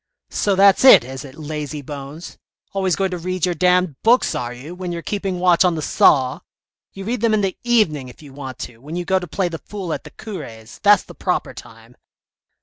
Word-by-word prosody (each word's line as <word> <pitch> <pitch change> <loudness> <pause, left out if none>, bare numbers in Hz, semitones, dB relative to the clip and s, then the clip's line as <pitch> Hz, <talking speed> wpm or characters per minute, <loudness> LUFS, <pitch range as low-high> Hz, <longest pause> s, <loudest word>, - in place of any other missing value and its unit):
" - - -58 0.2
So 200 -2 +3
that's 195 +2 +5
it, 260 - +9
is 130 +2 -8
it, 135 -1 -11
lazy 150 -1 -5
bones! 145 +4 -9 0.3
always 190 -3 +1
going 190 +2 -1
to 180 - -4
read 185 0 -1
your 180 - 0
damned 180 -3 +1
books 240 +3 +3
are 120 -1 -3
you, 130 +7 -9
when 180 -1 -5
you're 170 -1 -5
keeping 195 -3 -3
watch 175 -1 +4
on 180 -2 +2
the 155 - -4
saw? 130 -3 +3 0.5
You 195 - -8
read 235 +1 -2
them 225 -2 +3
in 210 - +1
the 195 -2 -1
evening 210 - +2
if 125 - -14
you 140 -2 -13
want 135 -2 -8
to, 115 -2 -15
when 150 +6 -8
you 175 0 -3
go 190 0 +2
to 180 - -7
play 185 +3 -1
the 165 -2 -6
fool 190 -6 -6
at - - -5
the - - -11
cure's, 140 - -9
that's 205 -2 +5
the - - -13
proper - - -2
time." - - -14
175 Hz, 230 wpm, -20 LUFS, 145-195 Hz, 0.5 s, it